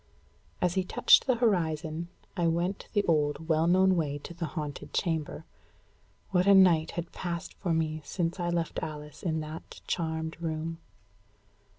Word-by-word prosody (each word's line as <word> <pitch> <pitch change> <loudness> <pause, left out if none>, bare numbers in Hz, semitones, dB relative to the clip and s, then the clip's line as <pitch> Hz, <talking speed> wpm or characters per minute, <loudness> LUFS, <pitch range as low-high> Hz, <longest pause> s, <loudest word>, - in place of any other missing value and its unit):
As 180 -1 +2
he 190 0 +1
touched 180 - +5
the 255 - +4
horizon, 165 -7 0 0.3
I 175 -3 +1
went 175 +4 -1
the 205 -2 +3
old, 150 -2 +1
well 160 0 +3
known 185 +1 +5
way 150 -4 -1
to - - -7
the 170 -1 -4
haunted 150 -4 -6
chamber. 160 -2 -1 0.9
What 180 0 +3
a 200 - +8
night 170 -4 +6
had 170 0 -3
passed 170 -2 -4
for 180 - -3
me 155 -1 0
since 170 +5 -2
I 175 0 0
left 170 -1 -1
Alice 150 -1 -7
in 160 -3 -1
that 155 +1 -8
charmed 160 -1 -3
room! 165 0 -3
165 Hz, 160 wpm, -29 LUFS, 155-180 Hz, 0.9 s, a